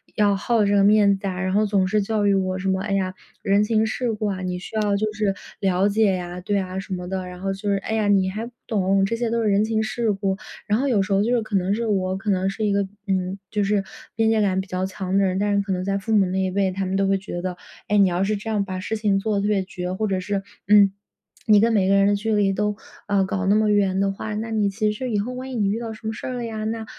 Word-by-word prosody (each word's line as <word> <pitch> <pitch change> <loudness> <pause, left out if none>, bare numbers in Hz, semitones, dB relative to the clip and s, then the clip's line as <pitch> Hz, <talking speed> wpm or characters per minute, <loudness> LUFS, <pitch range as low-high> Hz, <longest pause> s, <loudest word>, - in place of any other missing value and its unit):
要 205 -2 +3
好 215 +1 +1
这 205 - +2
个 200 - +4
面 205 -1 +5
子 195 - -9
啊， 185 -1 -3
然 185 0 -1
后 215 +1 +3
总 195 -2 +2
是 210 +1 +1
教 210 0 0
育 200 - +4
我 185 -1 0
什 190 +1 -4
么：” 190 0 0
哎 200 -1 -2
呀， 190 -1 0 0.3
人 200 +1 +3
情 220 +1 +2
世 235 +2 -1
故 215 0 -3
啊， 190 -2 -3
你 180 -1 -3
需 185 - -10
要 210 -2 +1
就 215 +1 -1
是 210 -2 0 0.3
了 190 0 +2
解 205 -2 +3
啊。 175 0 -6
“对 205 +3 0
啊， 185 0 -4
什 195 0 -6
么 180 -1 -4
的， 190 0 -3
然 180 0 -9
后 195 0 -1
就 200 +2 -4
是： 200 - +3
“哎 220 - -2
呀， 220 -2 +1
你 195 -2 +3
还 215 +4 -4
不 240 - -10 0.2
懂， 195 -2 +2
这 230 +4 -1
些 235 0 -1
都 230 0 0
是 - - +1
人 200 +1 +3
情 220 0 0
世 225 0 -1
故。” 195 -1 -1 0.3
然 210 +2 +2
后 280 - 0
有 220 -6 +3
时 195 +1 -1
候 195 +1 +3
就 240 - +1
是 235 - +1
可 215 -1 -4
能 190 +1 +1
是 235 +1 -2
我 190 -2 0
可 210 +2 -4
能 190 0 +1
是 215 +2 -3
一 205 - +1
个， 200 -1 +1 0.2
嗯， 190 0 -1
就 210 -1 0
是 200 0 +1 0.3
边 225 0 +2
界 220 -1 +3
感 190 -2 +1
比 190 - -11
较 185 0 -2
强 190 0 -4
的 200 - +4
人， 185 0 +1
但 205 0 +1
是 200 - +3
可 200 0 -4
能 185 -1 -1
在 195 +1 0
父 210 +3 -3
母 200 - +5
那 185 +1 -2
一 185 -1 0
辈， 195 0 +1
他 190 +1 -3
们 185 +1 -2
都 195 0 +2
会 195 0 +2
觉 180 -2 -6
得， 180 0 -3 0.3
诶， 210 - +2
你 195 -2 +5
要 175 +2 0
是 210 +2 0
这 210 +2 -6
样 205 -2 0
把 185 -1 -4
事 215 +4 -3
情 205 -2 +1
做 215 +1 -1
得 200 - +1
特 205 - 0
别 205 -2 +1
绝， 180 -1 -5
或 215 +3 -1
者 190 -2 0
是， 195 +1 -2 0.3
嗯， 200 -1 +6 0.5
你 210 -2 +6
跟 230 +1 +3
每 190 -3 +3
个 195 - +4
人 195 0 +4
的 205 - +3
距 220 +2 -1
离 200 -2 +2
都， 210 +1 -1 0.3
啊， 200 -1 +2
搞 190 +1 -2
那 200 - +4
么 215 0 +3
远 195 -2 +2
的 195 0 +2
话， 210 +2 -5
那 220 +2 -3
你 215 -2 +1
其 210 +2 0
实 250 +4 -4
以 210 - +1
后 235 +5 -3
万 260 +1 -6
一 - - -5
你 210 -4 +1
遇 205 - 0
到 230 -1 -5
什 220 0 -9
么 220 - -2
事 - - -8
儿 255 - -3
了 245 -1 -4
呀， 220 -1 -4
那， 225 0 -3
200 Hz, 330 characters per minute, -23 LUFS, 190-215 Hz, 0.5 s, 嗯